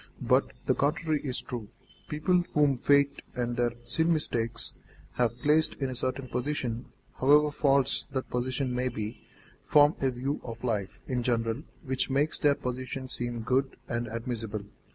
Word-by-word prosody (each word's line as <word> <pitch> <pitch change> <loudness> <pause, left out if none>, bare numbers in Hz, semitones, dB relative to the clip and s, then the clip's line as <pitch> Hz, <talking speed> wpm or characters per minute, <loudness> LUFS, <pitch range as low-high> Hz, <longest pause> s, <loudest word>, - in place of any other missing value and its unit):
But - - +3
the - - +3
contrary 155 +1 +1
is 130 -3 -2
true. 120 -5 -6 0.4
People 175 +4 +2
whom 145 -2 +4
fate 140 +2 +3
and 120 -1 -1
their 120 -1 +1
sin 160 +8 +1
mistakes 120 -7 0 0.4
have 120 -1 0
placed 155 +2 +4
in 135 -2 -2
a - - -3
certain 130 +1 -1
position, 125 -2 -2 0.3
however 150 +3 +5
false 140 -2 +2
that 130 -1 -2
position 130 +1 -1
may 125 +1 0
be, 110 -1 -5 0.4
form 145 +1 +6
a 135 - +3
view 130 +4 -2
of 115 0 -8
life 105 -6 -2
in 125 -2 -1
general 115 +1 0 0.2
which 130 0 0
makes 140 +3 +1
their 145 -1 +4
position 130 +1 -4
seem 120 -2 -3
good 130 +4 +1
and 120 0 -2
admissible. 115 -2 -3
130 Hz, 155 wpm, -29 LUFS, 120-140 Hz, 0.4 s, form